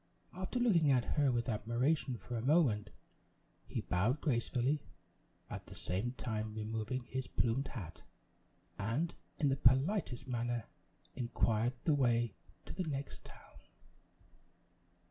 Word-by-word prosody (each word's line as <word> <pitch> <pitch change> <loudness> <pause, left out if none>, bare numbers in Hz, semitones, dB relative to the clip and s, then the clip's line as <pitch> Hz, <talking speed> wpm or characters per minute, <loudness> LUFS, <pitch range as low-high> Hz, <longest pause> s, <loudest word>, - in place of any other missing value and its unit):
After 185 +6 -3
looking 190 -11 +4
at 125 -3 +4
her 145 -3 +4
with 120 0 0
admiration 120 +5 +1
for 120 - -6
a 115 - -1
moment, 130 -6 +3 0.8
he - - -2
bowed 110 +11 +1
gracefully, 130 +1 +1 0.7
at - - -7
the - - -7
same 100 +8 -2
time 110 -4 -3
removing 110 +3 -2
his 130 +2 -4
plumed 125 +4 +1
hat, 90 -9 -7 0.8
and, 115 +12 0 0.2
in 145 - +3
the 135 - +2
politest 135 - +3
manner, 120 -2 -1 0.5
inquired 120 -1 +1
the 155 - +4
way 120 -5 +2 0.3
to - - -7
the 185 - -3
next 135 - -4
town. - - -14
125 Hz, 125 wpm, -35 LUFS, 115-140 Hz, 0.8 s, looking